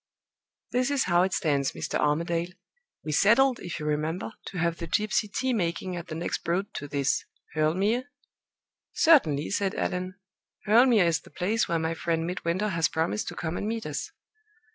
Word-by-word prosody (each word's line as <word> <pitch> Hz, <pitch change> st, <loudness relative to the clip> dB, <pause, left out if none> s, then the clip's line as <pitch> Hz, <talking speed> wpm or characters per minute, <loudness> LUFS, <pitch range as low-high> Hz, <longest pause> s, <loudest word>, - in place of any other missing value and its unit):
This 250 Hz, +1 st, +1 dB
is 285 Hz, -2 st, +2 dB
how 175 Hz, 0 st, +3 dB
it 190 Hz, +1 st, +1 dB
stands, 140 Hz, -6 st, 0 dB
Mr. -, -, -3 dB
Armadale. 170 Hz, +3 st, 0 dB, 0.5 s
We 155 Hz, -, -3 dB
settled, 235 Hz, -, +4 dB
if 175 Hz, -, -6 dB
you 150 Hz, -, -5 dB
remember, 155 Hz, +7 st, -2 dB, 0.2 s
to 190 Hz, -, -6 dB
have 170 Hz, 0 st, 0 dB
the 170 Hz, -, -5 dB
gypsy 210 Hz, +3 st, 0 dB
tea 260 Hz, +4 st, 0 dB
making 180 Hz, -2 st, -1 dB
at 175 Hz, 0 st, -6 dB
the 155 Hz, -, -6 dB
next 170 Hz, +2 st, -2 dB
'Broad' 190 Hz, +5 st, -2 dB
to 145 Hz, -, -5 dB
this 140 Hz, -1 st, 0 dB, 0.3 s
Hurle 155 Hz, +1 st, +1 dB
Mere?" 220 Hz, +7 st, +1 dB, 0.9 s
"Certainly," 160 Hz, -, +4 dB
said 195 Hz, -1 st, 0 dB
Allan. 185 Hz, +1 st, -2 dB, 0.5 s
"Hurle 230 Hz, +5 st, +6 dB
Mere 220 Hz, -7 st, +5 dB
is 165 Hz, -1 st, +2 dB
the -, -, -17 dB
place 210 Hz, +5 st, 0 dB
where 170 Hz, -3 st, +1 dB
my 160 Hz, 0 st, -1 dB
friend 165 Hz, 0 st, -1 dB
Midwinter 180 Hz, +3 st, -1 dB
has 165 Hz, -4 st, +2 dB
promised 160 Hz, -10 st, -1 dB
to -, -, -5 dB
come 160 Hz, +1 st, -3 dB
and 205 Hz, -, -3 dB
meet 225 Hz, +1 st, -3 dB
us." -, -, -4 dB
175 Hz, 185 wpm, -27 LUFS, 160-210 Hz, 0.9 s, Hurle